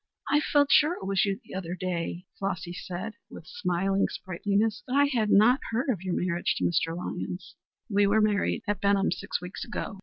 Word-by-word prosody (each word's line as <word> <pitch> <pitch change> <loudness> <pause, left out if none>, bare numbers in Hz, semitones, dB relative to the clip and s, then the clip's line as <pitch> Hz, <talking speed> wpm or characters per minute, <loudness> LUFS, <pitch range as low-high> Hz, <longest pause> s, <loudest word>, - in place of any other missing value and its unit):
"I 295 - +5
felt 290 -1 +2
sure 305 +3 +6
it - - -8
was 195 +1 +2
you 195 +1 -1
the - - -12
other 180 -2 -4
day," 180 -1 -3
Flossy 190 -3 -3
said 185 +4 -5 0.2
with - - -11
smiling 190 +4 0
sprightliness, 205 +4 -1
"but 255 - -2
I 285 0 +6
had 235 -7 0
not 235 +7 +6
heard 240 +5 -1
of 195 -8 -3
your 185 -2 -2
marriage 175 -1 0
to - - -2
Mr. 165 -1 +1
Lyons." 180 0 -5 0.3
"We 205 -2 +3
were 210 +2 +4
married 210 -1 +1
at 205 0 -1
Benham 200 0 +3
six 175 - -3
weeks 180 +2 -7
ago. 215 -4 -5
195 Hz, 200 wpm, -28 LUFS, 180-220 Hz, 0.3 s, sure